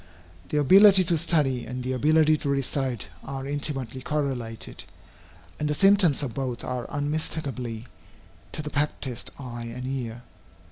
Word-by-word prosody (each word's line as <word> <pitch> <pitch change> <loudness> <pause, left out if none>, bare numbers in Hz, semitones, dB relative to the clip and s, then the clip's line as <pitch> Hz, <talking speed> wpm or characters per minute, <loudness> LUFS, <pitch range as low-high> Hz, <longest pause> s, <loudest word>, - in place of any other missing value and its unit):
The - - 0
ability 190 +6 +7
to 175 -1 +1
study 135 -7 +1
and 125 +2 -5
the 130 - -2
ability 155 +4 +4
to 145 - -3
recite 135 -3 -1
are 135 0 -5
intimately 135 -3 -3
correlated, 130 -6 -3 0.8
and 150 0 -1
the 150 - 0
symptoms 195 -6 +5
of 125 -5 -3
both 130 -2 -3
are 125 -1 -4
unmistakable 145 -5 -2 0.7
to - - -4
the 150 - -5
practised 145 -4 -2
eye 120 -3 -7
and 125 +2 -6
ear. 120 -3 -4
135 Hz, 140 wpm, -26 LUFS, 125-150 Hz, 0.8 s, ability